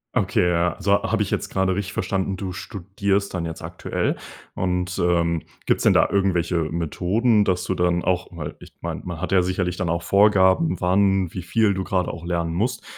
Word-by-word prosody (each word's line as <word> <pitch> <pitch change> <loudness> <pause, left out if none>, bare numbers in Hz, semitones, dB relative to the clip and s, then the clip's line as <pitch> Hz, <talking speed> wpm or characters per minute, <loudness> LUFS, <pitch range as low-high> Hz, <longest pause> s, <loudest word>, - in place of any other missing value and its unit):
Okay. 90 - +2
Ja, 85 0 +1
so 100 0 +2
habe 105 +1 0
ich 100 - -6
jetzt - - -2
gerade 95 -1 +1
richtig 100 0 -3
verstanden, 95 0 -1
du 95 -2 -4
studierst 100 +2 -2
dann 85 -2 -2
jetzt 80 -1 -6
aktuell? - - -2 0.4
Und, 90 0 -2
ähm, 85 -2 +1 0.2
gibt's - - +1
denn - - +5
da - - +4
irgendwelche 95 -3 +1
Methoden, 100 +7 +1
dass 90 -1 0
du 95 - -1
dann 90 -1 +1
auch 90 -1 0
mal 75 -4 -6
ich - - -14
meine, - - -4
man 85 -3 -5
hat 95 - -4
ja 95 - +5
sicherlich 90 -1 -1
dann 90 -1 -2
auch 85 0 -1
Vorgaben, 100 - +4
wann, 95 -1 +2
wie 90 - -4
viel 100 +4 +2
du 95 0 -2
gerade 90 -2 -1
auch 85 +1 -9
lernen 85 -1 -1
musst, 110 +9 -1
90 Hz, 200 wpm, -23 LUFS, 85-100 Hz, 0.4 s, denn